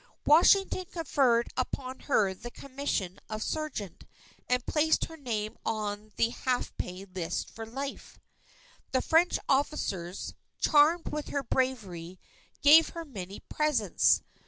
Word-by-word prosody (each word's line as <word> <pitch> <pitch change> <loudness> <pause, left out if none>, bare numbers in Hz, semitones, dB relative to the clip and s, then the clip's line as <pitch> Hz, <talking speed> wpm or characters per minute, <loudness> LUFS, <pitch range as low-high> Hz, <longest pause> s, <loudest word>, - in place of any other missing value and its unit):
Washington 370 +4 +5
conferred 265 -8 +2
upon 255 0 -3
her 205 -9 +2
the 220 +6 -9
commission 255 -9 -3
of 215 0 -3
sergeant, 300 - -4 0.4
and 250 -1 +1
placed 315 +1 +2
her 325 - -11
name 220 -8 -3
on 215 -1 -3
the 230 - +2
half 250 +1 -2
pay 185 +2 -5
list 180 -2 -4
for 225 0 -8
life. 275 +4 -6 0.8
The 260 - +2
French 335 +2 +3
officers, 200 - -1 0.2
charmed 310 +3 +4
with 300 -1 -4
her 280 - -2
bravery, 195 -10 -2 0.4
gave 310 +3 +8
her 335 -1 -7
many 200 - -8
presents. 295 - +2
255 Hz, 125 wpm, -29 LUFS, 205-295 Hz, 0.8 s, gave